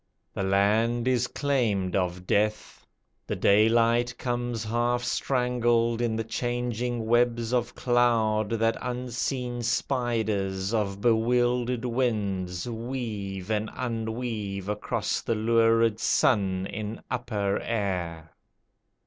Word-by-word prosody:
The - - -3
land 110 +5 +2
is 125 -1 +2
claimed 110 -10 0
of 90 -1 -1
Death: 105 +2 -1 0.4
the - - -2
daylight 115 +3 +3
comes 120 -2 -2
Half 120 +2 0
strangled 120 -2 +1
in 115 -2 0
the 115 - -1
changing 120 0 -2
webs 120 0 +2
of 120 -1 0
cloud 115 -4 +2
That 115 0 +1
unseen 125 0 -3
spiders 110 -6 -1
of 100 -3 -1
bewildered 120 +1 +2
winds 100 -7 -1
Weave 110 -5 -4
and 105 0 0
unweave 110 -4 -3
across 105 0 -1
the 115 - -1
lurid 115 0 +3
sun 95 -7 +2
In 105 +2 -5
upper 105 -6 -1
air. 90 -7 -3
115 Hz, 105 wpm, -27 LUFS, 105-120 Hz, 0.4 s, daylight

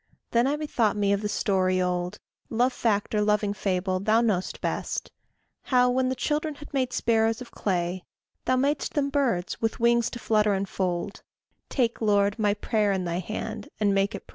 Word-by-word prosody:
Then 235 +2 +3
I 285 - +1
bethought 240 -9 0
me 200 -1 +2
of 200 - 0
the 210 - -2
story 185 -3 +1
old 180 +1 -1 0.3
Love 245 +3 +2
fact 215 -4 0
or 210 - +2
loving 210 -1 +2
fable, 185 -1 -1
thou 215 +4 +3
know'st 210 -6 0
best - - -3 0.5
How, 250 -1 +3
when 255 0 +1
the 260 - -1
children 300 +3 -1
had 295 +1 -12
made 260 -2 0
sparrows 225 -1 +1
of 250 - -10
clay, 180 -2 -2 0.4
Thou 255 - +3
mad'st 280 +3 0
them 280 -2 +1
birds, 250 -11 0
with 225 +1 -1
wings 235 0 +3
to - - -7
flutter 215 -3 +2
and 195 +1 -2
fold: 185 +1 -2 0.5
Take, 235 -4 0
Lord, 205 0 +2
my 205 -1 +2
prayer 210 -1 +1
in 190 -1 0
thy 170 0 -1
hand, 215 +3 -5
and 205 -2 +2
make 195 +1 +1
it - - -8
pray. - - -46
215 Hz, 190 wpm, -26 LUFS, 195-245 Hz, 0.5 s, Then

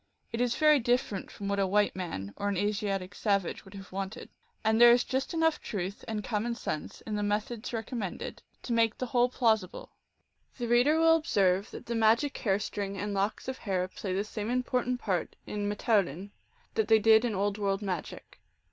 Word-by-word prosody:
It 230 +1 -2
is 245 -1 +1
very 305 -2 +5
different 240 -5 0
from 200 - -7
what 200 0 0
a 195 - +2
white 205 +2 +2
man 100 - -5
or 205 - -2
an 200 - -1
Asiatic 200 -1 -1
savage 200 -4 -1
would 195 +1 -14
have 195 -1 -10
wanted; 195 +2 -5 0.3
and 220 +1 +3
there 240 - +10
is 240 +1 +5
just 265 +1 -2
enough 325 -2 +1
truth 195 -1 -4
and 215 -2 -3
common 230 +2 -1
sense 155 -8 -5
in 215 - -4
the 210 - -1
methods 210 +3 -2
recommended 225 -4 -4 0.2
to 240 - -2
make 225 -1 +2
the 255 - -2
whole 245 0 +2
plausi 220 -6 +2
ble. - - -10 0.7
The 240 -2 -3
reader 245 +7 +4
will 325 0 +6
observe 195 - +1
that - - -9
the 235 - -3
magic 230 +5 +3
hair 195 -3 +2
string 200 -1 -4
and 205 +2 -3
locks 200 +4 -1
of 260 0 -4
hair 185 -3 -1
play 185 +1 -6
the 190 +2 0
same 215 0 -5
important 250 0 0
part 190 -7 -2
in 205 -1 -3
rrfteoulin 200 -4 0 0.4
that 220 -1 +1
they 220 0 +6
did 220 +1 +5
in 235 -4 -1
Old 200 +2 -1
World 200 0 0
magic. 185 -5 -5
210 Hz, 200 wpm, -29 LUFS, 195-240 Hz, 0.7 s, there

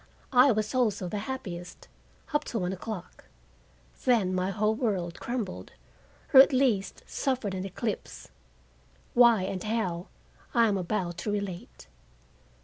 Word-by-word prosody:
I 255 +2 +7
was 215 0 -1
also 215 -7 +1
the 205 +3 -3
happiest—up 235 - -6
to 235 - -3
one 180 -2 -1
o'clock. 190 -1 -7 0.8
Then 220 -7 +3
my 185 +1 0
whole 215 +2 +1
world 195 -8 -2
crumbled, 235 -6 -4 0.6
or, 265 - +10
at 275 - +5
least, 255 -7 +1
suffered 255 -7 -2
an 190 0 -3
eclipse. 205 +3 -5 0.8
Why 235 -5 +6
and 185 -1 -3
how, 200 -5 -2 0.5
I 230 -1 +5
am 200 -2 +1
about 175 -2 -2
to 210 - -2
relate. 200 - -5
210 Hz, 130 wpm, -28 LUFS, 185-235 Hz, 0.8 s, or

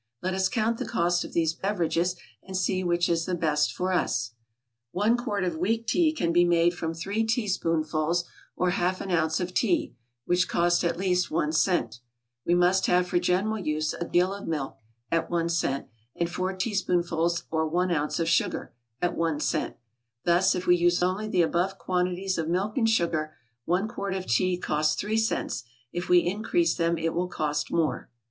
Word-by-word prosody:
Let 185 +1 -1
us 190 0 +1
count 225 -1 0
the - - -3
cost 175 -5 +1
of - - -9
these 160 -1 +2
beverages, 180 -1 0 0.3
and 190 0 -5
see 185 0 0
which 175 0 +1
is 165 -1 0
the 185 - 0
best 150 -3 +1
for 185 +1 -2
us. 120 -9 0 0.6
One 210 +5 +2
quart 215 -6 -2
of 175 -3 -1
weak 225 +7 0
tea 315 +7 +3
can 170 - -1
be 175 +1 +5
made 175 0 +3
from 165 -1 -4
three 195 +7 -1
teaspoonfuls, 170 -7 0 0.3
or 180 0 +1
half 185 0 0
an 195 - -4
ounce, 160 -2 +1
of 180 0 -3
tea, 335 - +1 0.3
(which 180 +1 +2
cost 175 +1 +2
at 170 -1 0
least 180 -1 +1
one 155 -1 0
cent;) 155 - +1 0.5
we 175 - +4
must 180 +2 +3
have 180 0 +3
for 175 0 +1
general 195 +5 0
use 155 -3 -1
a 170 - -4
gill 180 +2 +2
of 200 - -8
milk, 145 -4 -3 0.3
(at 165 -1 0
one 170 -1 0
cent,) 160 -5 -1 0.3
and 170 0 -1
four 185 +2 -1
teaspoonfuls 175 -4 0
or 160 0 +1
one 180 +3 0
ounce 150 -1 0
of 165 - 0
sugar, 165 0 0 0.3
(at 175 - +1
one 165 -3 0
cent); 155 0 -1 0.5
thus 175 +2 +3
if 180 0 -3
we 175 - +5
use 175 +1 +2
only 190 +4 0
the 180 -5 +2
above 180 +4 0
quantities 180 0 -1
of 160 0 -2
milk 190 +5 -1
and 230 -5 +2
sugar, 165 -7 0 0.3
one 180 +5 +1
quart 200 -3 -4
of 185 -1 -4
tea 180 +10 +1
costs 155 -3 0
three 210 +2 -1
cents; 220 - -1 0.3
if 175 +1 -4
we 175 -1 +5
increase 220 - +1
them 170 0 0
it 165 0 -1
will 180 +1 -1
cost 150 -3 -2
more. 165 -3 0
175 Hz, 190 wpm, -27 LUFS, 165-190 Hz, 0.6 s, be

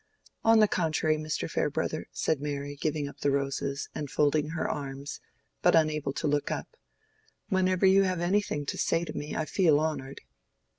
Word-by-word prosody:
"On 225 0 +6
the 215 -1 +6
contrary, 155 -4 +1
Mr. 155 0 -3
Farebrother," - - -1
said 150 -3 -1
Mary, 145 -1 -4
giving 150 0 -2
up 140 - -11
the 145 - +1
roses, 140 0 -1
and 145 -2 -4
folding 150 +2 +2
her 165 0 -2
arms, 140 -1 -5 0.4
but - - +5
unable 155 -3 +2
to 155 - -2
look 145 0 0
up, - - -5 0.7
"whenever 185 0 +2
you 190 +1 +6
have 185 -2 0
anything 175 -4 0
to - - -4
say 170 - +1
to 155 - -6
me 150 -1 -5
I 160 - -1
feel 160 -4 +3
honored." 145 -4 -3
155 Hz, 175 wpm, -29 LUFS, 145-170 Hz, 0.7 s, On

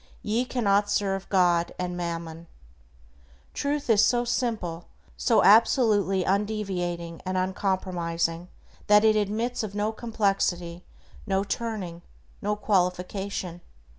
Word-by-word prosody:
Ye 225 +4 0
cannot 205 -5 +1
serve 195 -2 -1
God 175 -3 +2
and 180 -1 -3
Mammon." 170 -1 -5 1.1
Truth 285 0 -2
is 220 -2 +5
so 240 +1 +2
simple, 220 -9 -2 0.3
so 230 - +3
absolutely 205 -3 +4
undeviating 185 -4 -2
and 185 0 -2
uncompromising 180 -3 -1 0.4
that 210 +1 +6
it 215 0 +5
admits 215 +4 -1
of 210 -2 -5
no 210 +1 0
complexity, 195 -6 -1 0.4
no 195 -1 +1
turning, 200 -5 -4 0.4
no 210 +1 0
qualification. 185 -2 -1
195 Hz, 105 wpm, -26 LUFS, 175-215 Hz, 1.1 s, that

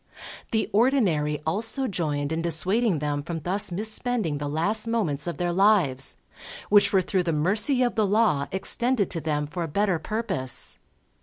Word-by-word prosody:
The 220 -1 0
Ordinary 195 - +2
also 225 - -1
joined 150 - -2
in 160 +1 -1
dissuading 185 +5 +1
them 145 0 -2
from 165 +1 -5
thus 195 +3 -1
misspending 215 - -2
the 145 - -3
last 205 +9 -1
moments 180 -11 -1
of 170 - -3
their 175 -1 -1
lives, 180 -9 +2 0.5
which 205 -1 +5
were 190 -2 +3
through 185 +1 0
the 175 -2 -1
mercy 210 - +2
of 245 - +1
the 215 -3 +1
Law 200 -9 +2
extended 220 +3 0
to 165 - -3
them 150 -1 -1
for 165 +4 -6
a 165 - -1
better 190 +2 0
purpose. 190 - -2
185 Hz, 165 wpm, -25 LUFS, 155-215 Hz, 0.5 s, which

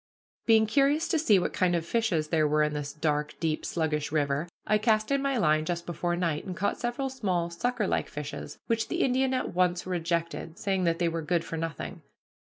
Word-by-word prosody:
Being 220 -1 +6
curious 280 +7 +2
to 330 - +2
see 225 -10 +5
what 180 - -1
kind 180 -2 +2
of 165 -1 -1
fishes 175 -8 0
there 155 -2 +3
were 150 +1 +3
in 150 0 0
this 145 -1 -3
dark, 150 -1 -1
deep, 160 -2 -1
sluggish 150 -3 -1
river, 145 +1 0 0.2
I 215 - +3
cast 215 +1 +2
in 275 0 +2
my 275 -1 0
line 155 -7 +3
just 170 +1 -3
before 175 +1 -1
night, 170 -4 -1
and 185 -2 -6
caught 200 - 0
several 240 +3 -2
small 185 -10 -1
sucker 235 +5 -1
like - - 0
fishes, 145 0 -6
which 225 -1 0
the - - 0
Indian 260 0 +2
at 255 - -2
once 180 0 +1
rejected, 170 -2 -2
saying 190 -2 0
that 165 -1 +2
they 175 - +1
were 165 0 -2
good 170 +1 0
for - - -5
nothing. 165 -3 -5
175 Hz, 210 wpm, -28 LUFS, 160-220 Hz, 0.2 s, Being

